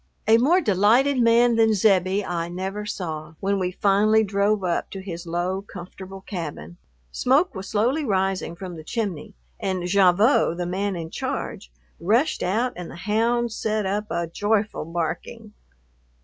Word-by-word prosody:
A 225 +1 +6
more 335 +10 +4
delighted 235 - +3
man 235 0 +4
than 225 -1 +4
Zebbie 195 -1 +2
I 170 -1 -3
never 190 +4 -4
saw 160 -5 -5
when 200 0 0
we 180 -1 0
finally 210 +3 +3
drove 200 0 +1
up 175 -2 -1
to 195 - -7
his 175 -2 -7
low, 175 +3 -2
comfortable 190 0 -10
cabin. 150 - -7 0.3
Smoke 285 +9 +2
was 190 -2 -7
slowly 245 +9 +1
rising 190 -6 -1
from 180 -1 -8
the 155 - -9
chimney, 200 -4 -4 0.2
and 185 -2 -2
Gavotte, 190 - +4
the 175 - -2
man 190 +2 -2
in 165 -1 -6
charge, - - -4 0.3
rushed 230 - +1
out 230 +7 0
and 180 -1 -7
the - - -10
hounds 230 +2 +1
set 215 -1 -1
up 205 +2 -2
a 170 0 -1
joyful 205 +2 -1
barking. 190 +6 -5
195 Hz, 155 wpm, -24 LUFS, 180-220 Hz, 0.3 s, A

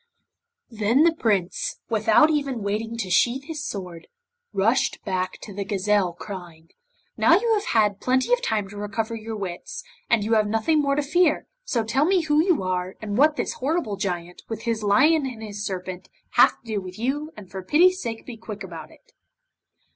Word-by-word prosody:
Then 225 +6 +3
the 335 0 +4
Prince, 205 - -1
without 225 +6 +4
even 275 -7 -1
waiting 220 +3 -2
to 195 -5 -3
sheathe 250 +8 +3
his 310 -1 -6
sword, 180 -7 -6 0.4
rushed 215 +6 +1
back 185 -2 -1
to 205 - -9
the 200 +1 -3
gazelle, 195 -2 +1
crying: 175 -3 -9 0.5
'Now - - +6
you 465 -1 +1
have 420 -1 0
had 210 -3 +2
plenty 260 - +2
of - - +2
time 215 - -1
to 205 - -10
recover 210 +3 -3
your 225 0 -5
wits, 190 -4 -6 0.3
and 230 -3 +3
you 220 +2 0
have 215 -1 +3
nothing 225 +9 +2
more 280 -1 +1
to 295 - 0
fear, 315 +2 +2 0.2
so 235 - 0
tell 265 +7 +1
me 370 +1 +3
who 310 -1 +3
you 355 - +2
are, 185 0 -2
and 205 -2 -4
what 300 +5 +4
this - - -2
horrible 280 -6 -1
Giant, 180 -3 -4
with 225 -1 -5
his 230 -2 -1
lion 270 +9 +4
and 230 -4 -7
his 205 -1 -6
serpent, 185 -2 -5 0.2
have - - +5
to - - -36
do 215 -3 -2
with 185 0 -9
you 285 +7 -2
and 200 -4 -11
for 190 - -5
pity's 360 - +4
sake 225 -2 -5
be 240 -3 -8
quick 215 -2 -8
about 165 -4 -8
it. - - -22
220 Hz, 190 wpm, -24 LUFS, 195-275 Hz, 0.5 s, Now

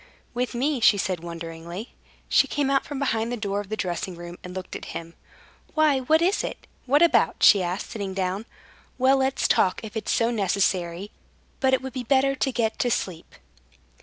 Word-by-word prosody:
"With 245 0 -2
me?" 275 +3 0
she 210 -2 +5
said, 185 -2 -1
wonderingly. 170 +4 -7 0.3
She - - +4
came 285 -2 0
out 275 - +2
from 285 - -6
behind 230 -4 0
the 245 - -2
door 200 -2 -2
of 200 - -12
the 215 - -3
dressing 185 -1 -3
room, 175 0 -9
and 180 0 -8
looked 185 -1 -6
at - - -6
him. 165 0 -9 0.6
"Why, 305 -3 +4
what 315 +6 +3
is 380 +4 +2
it? - - -6 0.2
What 290 +5 +5
about?" 340 - +3
she 200 - +8
asked, 180 +2 -3
sitting 200 -4 -4
down. 190 +4 -2 0.5
"Well, 260 +1 +4
let's 265 0 +1
talk, 185 -1 +2
if 220 0 -8
it's 220 - -2
so 230 0 +2
necessary. 195 -3 0 0.5
But 265 -1 +4
it 260 - -5
would 265 - -6
be 260 - -3
better 270 +2 +3
to 270 0 -1
get 230 -3 -1
to 245 - +2
sleep." 185 -7 -3
220 Hz, 195 wpm, -25 LUFS, 185-265 Hz, 0.6 s, she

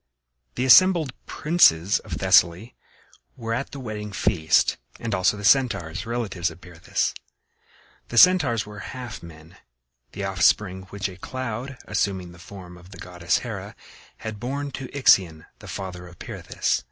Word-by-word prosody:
The 130 - -1
assembled 165 -1 +6
princes 100 - +3
of - - -9
Thessaly 90 +8 +3 0.6
were 115 0 -3
at 130 +4 -3
the 140 - -9
wedding 105 -4 -6
feast, 95 -5 +2 0.2
and 115 -2 -4
also 95 +2 +2
the 105 - -6
Centaurs, 100 - +2
relatives 105 -7 -2
of 80 0 -13
Pirithous. 85 -2 -3 0.9
The 120 - -6
Centaurs 130 - +5
were 105 0 -10
half 125 +2 -8
men, 80 +1 -14 0.6
the 100 - -5
offspring 95 0 +1
which 100 0 -3
a 95 -2 -11
cloud, 130 +3 -6
assuming 95 -3 -2
the 85 - -15
form 90 -1 -11
of 90 +1 -16
the 95 - -12
goddess 90 -1 -1
Hera, - - -7 0.4
had 110 -2 -7
born 140 +4 -4
to 130 -1 -7
Ixion, 95 - +3
the - - -12
father 90 -2 -7
of 90 -1 -15
Pirithous. - - -2
100 Hz, 150 wpm, -24 LUFS, 90-125 Hz, 0.9 s, assembled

